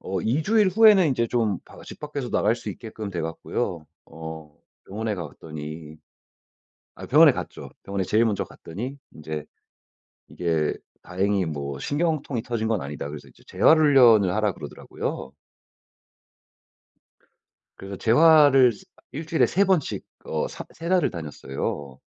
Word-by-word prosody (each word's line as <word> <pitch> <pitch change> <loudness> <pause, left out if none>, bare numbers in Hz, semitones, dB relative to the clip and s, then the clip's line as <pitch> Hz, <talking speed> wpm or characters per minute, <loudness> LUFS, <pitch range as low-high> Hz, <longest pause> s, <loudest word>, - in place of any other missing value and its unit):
어 95 -1 -3
2 120 - 0
주일 210 +2 +3
후에는 200 -3 +6
인제 120 -4 0
좀 110 -6 0
바 - - -15
집 - - -11
밖에서 145 -4 -5
나갈 110 +3 +2
수 120 - -6
있게끔 110 -3 -7
돼 90 -3 -4
갖고요. 80 0 -4 0.2
어 80 -2 -9 0.3
병원에 110 +2 -3
가 85 -4 -5
봤더니 75 +1 -9 1.0
아 - - -9
병원에 - - +7
갔죠. - - -7
병원에 100 -1 -2
제일 110 +5 +2
먼저 105 -3 0
갔더니 120 +12 -8
인제 75 -1 -6 0.8
이게 80 -3 -1 0.3
"다행히 95 +1 0
뭐 70 -3 -5
신경통이 145 - -1
터진 115 -2 -2
건 110 -3 0
아니다." 70 +1 -6
그래서 75 0 -9
인제 - - -21
"재활 160 - +4
훈련을 120 -11 +6
하라."고 105 -3 0
그러더라고요. 70 -2 -6 2.5
그래서 100 0 -7
재활을 140 - +6
세 100 - -15 0.3
1 155 +4 -6
주일에 160 0 +3
3 195 +3 +2
번씩 185 -7 0 0.2
어 - - -1
사 - - -8
세 165 +1 -6
달을 185 -1 +3
다녔어요. 70 -3 -5
105 Hz, 290 characters per minute, -24 LUFS, -, 2.5 s, 병원에